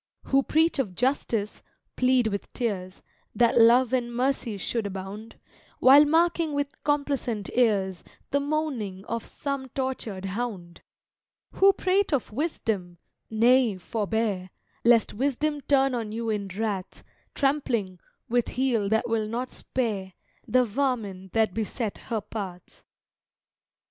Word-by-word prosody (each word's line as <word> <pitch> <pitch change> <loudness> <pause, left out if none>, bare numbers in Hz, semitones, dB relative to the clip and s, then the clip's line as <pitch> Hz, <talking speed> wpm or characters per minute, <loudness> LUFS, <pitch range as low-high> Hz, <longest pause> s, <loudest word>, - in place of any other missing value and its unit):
Who 275 0 +3
preach 320 +2 +2
of 200 -9 -1
Justice 235 -4 -1 0.3
plead 255 -1 +3
with 200 -2 -3
tears 195 -6 -3 0.3
That 235 +1 +4
Love 240 +2 +5
and 240 -2 0
Mercy 245 -3 -1
should 220 +2 -2
abound 195 +3 -7 0.4
While 280 +3 +8
marking 325 0 +2
with 285 0 -3
complacent 280 -8 -1
ears 200 -7 +1 0.3
The 280 - +3
moaning 275 -10 -2
of 230 0 -3
some 275 -2 -5
tortured 235 -7 -3
hound: 190 -4 -5 0.7
Who 390 +1 +5
prate 385 0 +1
of 265 -6 0
Wisdom 210 - -2 0.3
nay, 235 -1 +4
forbear, 205 -1 -2 0.3
Lest 235 -2 +4
Wisdom 285 +5 -1
turn 270 -1 +3
on 225 -3 -3
you 225 0 -2
in 205 -2 -2
wrath, 195 -1 -4 0.3
Trampling, 245 - 0 0.3
with 240 0 +1
heel 240 -6 0
that 220 +3 +1
will 225 -2 0
not 245 +3 -3
spare, 205 -7 -3 0.3
The 255 0 +3
vermin 215 -6 -2
that 220 -4 +2
beset 220 0 -3
her 225 -3 -1
path! 195 -4 -8
230 Hz, 125 wpm, -26 LUFS, 205-270 Hz, 0.7 s, While